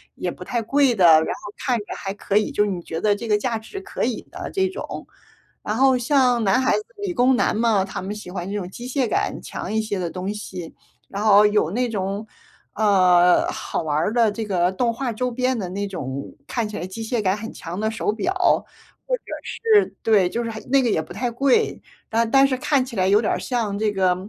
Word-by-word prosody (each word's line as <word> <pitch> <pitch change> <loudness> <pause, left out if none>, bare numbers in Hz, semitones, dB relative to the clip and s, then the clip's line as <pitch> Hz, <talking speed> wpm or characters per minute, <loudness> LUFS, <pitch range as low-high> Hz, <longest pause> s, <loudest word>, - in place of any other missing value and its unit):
也 - - -3
不 - - -10
太 240 -2 -1
贵 270 +2 +2
的， 190 -4 +4
然 160 -1 +7
后 205 - -10
看 250 -3 0
着 205 - -8
还 195 -1 -4
可 200 0 -1
以， 215 - +2
就 210 - +1
是 210 - -1
你 180 -2 -4
觉 165 -1 -5
得 210 -1 +3
这 210 +3 -5
个 210 -1 +3
价 230 +2 -1
值 225 - -8
可 395 - -4
以 - - -2
的 - - -6
这 380 -1 +1
种。 390 +6 -7 0.6
然 210 - -2
后 260 +1 +4
像 250 -2 +2
男 215 +6 +3
孩 260 - +2
子， 425 - -4
理 400 -3 -3
工 255 -3 +3
男 - - +1
嘛， 220 -3 +2
他 195 - -6
们 195 +3 -4
喜 210 -4 -9
欢 180 -1 -5
这 - - -3
种 180 -2 -6
机 240 +6 -9
械 260 -1 0
感 - - -1
强 - - -6
一 220 0 +1
些 215 -2 -3
的 175 -2 -3
东 185 +2 -4
西， 185 -5 -8 0.3
然 200 +1 -4
后 210 -1 +7
有 210 -6 +1
那 245 +4 0
种， 200 0 -3 0.5
呃， 185 -4 +4
好 - - -3
玩 150 -2 -1
儿 165 +7 0
的 230 -3 +3
这 220 +1 -4
个 180 -3 +1
动 230 +5 0
画 250 +1 -3
周 250 +3 -2
边 255 +1 0
的 195 -5 -3
那 200 +2 -3
种 140 -7 -6
看 230 -3 -2
起 210 - -6
来 175 - -4
机 185 +5 -7
械 230 +1 -1
感 190 -2 +1
很 220 +2 -7
强 175 +3 -7
的 220 +1 0
手 220 -1 -1
表， 230 +12 -2 0.8
或 - - +2
者 - - -39 0.2
是 435 -3 +2
对， 205 -5 +4
就 235 +5 -2
是 230 - -3
很 220 - -7
那 270 0 +4
个 240 - +1
也 160 - +1
不 155 - -13
太 240 +5 -2
贵， 265 +2 +1 0.3
但 225 0 +1
但 270 +3 +5
是 265 - 0
看 285 -1 +1
起 255 -2 -9
来 185 -2 +2
有 200 +2 +5
点 220 - 0
儿 - - -2
像 220 -5 -2
这 215 -1 +1
个， 185 -2 +2
215 Hz, 260 characters per minute, -22 LUFS, 190-245 Hz, 0.8 s, 然